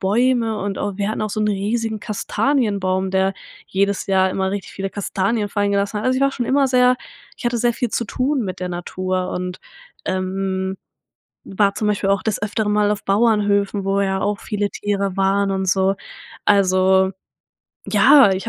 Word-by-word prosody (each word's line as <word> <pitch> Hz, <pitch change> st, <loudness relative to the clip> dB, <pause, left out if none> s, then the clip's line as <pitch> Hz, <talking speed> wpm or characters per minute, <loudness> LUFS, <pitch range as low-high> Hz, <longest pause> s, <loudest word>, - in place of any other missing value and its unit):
Bäume 225 Hz, +2 st, +1 dB
und 200 Hz, -1 st, -3 dB
auch 200 Hz, -2 st, -3 dB
wir 200 Hz, +1 st, 0 dB
hatten 215 Hz, -, -2 dB
auch 215 Hz, -, -2 dB
so 215 Hz, -, -2 dB
'nen 210 Hz, -1 st, +1 dB
riesigen 220 Hz, +2 st, -2 dB
Kastanienbaum, 200 Hz, -4 st, 0 dB
der 190 Hz, 0 st, +2 dB, 0.3 s
jedes 200 Hz, +1 st, 0 dB
Jahr 190 Hz, -1 st, +3 dB
immer 190 Hz, 0 st, -1 dB
richtig 200 Hz, -1 st, -5 dB
viele 195 Hz, 0 st, -4 dB
Kastanien 205 Hz, +2 st, -1 dB
fallen 205 Hz, 0 st, 0 dB
gelassen 200 Hz, +1 st, 0 dB
hat. -, -, -5 dB
Also, 255 Hz, 0 st, +2 dB
ich -, -, -1 dB
war 275 Hz, -, +3 dB
schon 245 Hz, -3 st, -3 dB
immer 275 Hz, 0 st, +3 dB
sehr 250 Hz, -1 st, +4 dB, 0.4 s
ich 240 Hz, -, -3 dB
hatte 240 Hz, 0 st, 0 dB
sehr 240 Hz, +1 st, +2 dB
viel 245 Hz, -, -2 dB
zu 235 Hz, -, -1 dB
tun 260 Hz, +4 st, -1 dB
mit 185 Hz, -1 st, -5 dB
der 180 Hz, -, -2 dB
Natur 185 Hz, +1 st, -3 dB
und, 180 Hz, 0 st, -4 dB, 0.5 s
ähm, 190 Hz, 0 st, -2 dB, 0.7 s
war 200 Hz, 0 st, +1 dB
zum 210 Hz, -, -1 dB
Beispiel 195 Hz, -1 st, 0 dB
auch 195 Hz, -1 st, +1 dB
des 215 Hz, -2 st, -1 dB
Öfteren 210 Hz, 0 st, -1 dB
mal 210 Hz, 0 st, +3 dB
auf 210 Hz, -, -3 dB
Bauernhöfen, 205 Hz, -1 st, +2 dB
wo 195 Hz, 0 st, +1 dB
ja 190 Hz, -1 st, 0 dB
auch 205 Hz, 0 st, -1 dB
viele 205 Hz, -2 st, -2 dB
Tiere 200 Hz, -2 st, -2 dB
waren 195 Hz, +1 st, +2 dB
und 190 Hz, -1 st, -1 dB
so. 190 Hz, +1 st, +2 dB, 0.5 s
Also 190 Hz, -1 st, +4 dB, 0.8 s
ja, 245 Hz, +1 st, +6 dB
ich 185 Hz, -, -4 dB
200 Hz, 185 wpm, -20 LUFS, 190-215 Hz, 0.8 s, ja